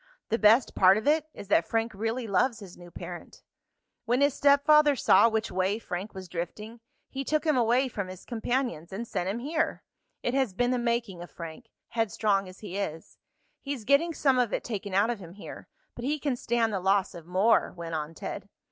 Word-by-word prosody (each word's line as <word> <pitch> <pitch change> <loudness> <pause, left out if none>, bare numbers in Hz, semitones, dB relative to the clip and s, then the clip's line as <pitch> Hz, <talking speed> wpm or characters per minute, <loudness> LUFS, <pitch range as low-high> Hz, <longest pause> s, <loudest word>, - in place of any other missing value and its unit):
The 225 - 0
best 225 +4 +5
part 190 +1 +6
of 220 - -3
it 310 +1 +3
is 200 - -10
that 170 -4 +3
Frank 225 0 -1
really 225 +4 -2
loves 225 +3 +1
his 195 -5 -11
new 175 0 -13
parent. - - -9 0.6
"When 245 +3 +1
his 285 -1 +4
stepfather 290 +1 +5
saw 210 -1 +5
which 220 0 -2
way 190 +3 0
Frank 195 -2 -6
was 190 -1 -7
drifting, 210 +7 -6 0.3
he 270 0 -5
took 305 +2 0
him 305 -2 +3
away 245 +2 +3
from 200 -6 -4
his 185 0 -10
companions, 235 - -2
and 220 +5 -5
sent 180 -3 -2
him 205 - -2
here. 300 +6 -2 0.4
It 245 - -1
has 260 -8 0
been 245 +4 +1
the 250 - +1
making 235 -6 -1
of 175 - -9
Frank, 165 -2 -9 0.2
headstrong 205 -3 0
as 185 - -14
he 200 -3 -6
is. 165 -5 -6 0.4
He's 275 -6 -5
getting 285 +7 +3
some 265 -3 +3
of 240 -3 +1
it - - -2
taken 205 -4 -4
out 205 +4 +3
of 235 - -5
him 175 -3 -11
here, 200 - -10 0.3
but 240 - -9
he 295 +4 0
can 285 -3 -1
stand 235 -2 0
the 195 - 0
loss 190 +1 +1
of 170 -2 -11
more," 190 +6 +3
went 170 -2 -7
on 155 +1 -4
Ted. - - -6
225 Hz, 210 wpm, -28 LUFS, 190-250 Hz, 0.6 s, part